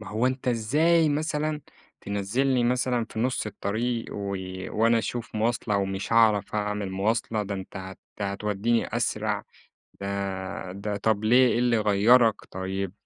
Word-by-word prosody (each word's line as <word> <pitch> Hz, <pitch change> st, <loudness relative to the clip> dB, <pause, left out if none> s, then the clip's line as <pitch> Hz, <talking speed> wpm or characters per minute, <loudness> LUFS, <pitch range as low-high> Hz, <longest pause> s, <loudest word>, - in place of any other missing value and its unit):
ما 110 Hz, -, -9 dB
هو 110 Hz, +4 st, 0 dB
أنت 130 Hz, 0 st, -1 dB
إزاي 150 Hz, +8 st, +3 dB
مثلًا 150 Hz, 0 st, -1 dB, 0.4 s
تنزّلني 120 Hz, +6 st, 0 dB
مثلًا 125 Hz, -1 st, +1 dB
في -, -, -7 dB
نص 125 Hz, -1 st, 0 dB
الطريق، 115 Hz, +3 st, -3 dB
و 100 Hz, -1 st, -3 dB, 0.3 s
وأنا 115 Hz, +2 st, +3 dB
أشوف 115 Hz, 0 st, -4 dB
مواصلة 110 Hz, -1 st, 0 dB
ومش 95 Hz, +1 st, -2 dB
هاعرف 110 Hz, -3 st, +4 dB
أعمل 105 Hz, -2 st, -2 dB
مواصلة، 110 Hz, +3 st, 0 dB
ده 100 Hz, 0 st, -4 dB
أنت 95 Hz, -1 st, -7 dB
هت 95 Hz, 0 st, -7 dB, 0.2 s
هتوديني 105 Hz, +3 st, -1 dB
أسرع، -, -, -1 dB, 0.6 s
ده 95 Hz, -2 st, -4 dB
ده 100 Hz, +2 st, -4 dB
طب 110 Hz, +1 st, 0 dB
ليه 125 Hz, +3 st, +6 dB
إيه 120 Hz, -, +1 dB
اللي 120 Hz, -1 st, +3 dB
غيرك؟ 110 Hz, +2 st, +5 dB
طيب 95 Hz, 0 st, -3 dB
110 Hz, 140 wpm, -26 LUFS, 100-120 Hz, 0.6 s, ليه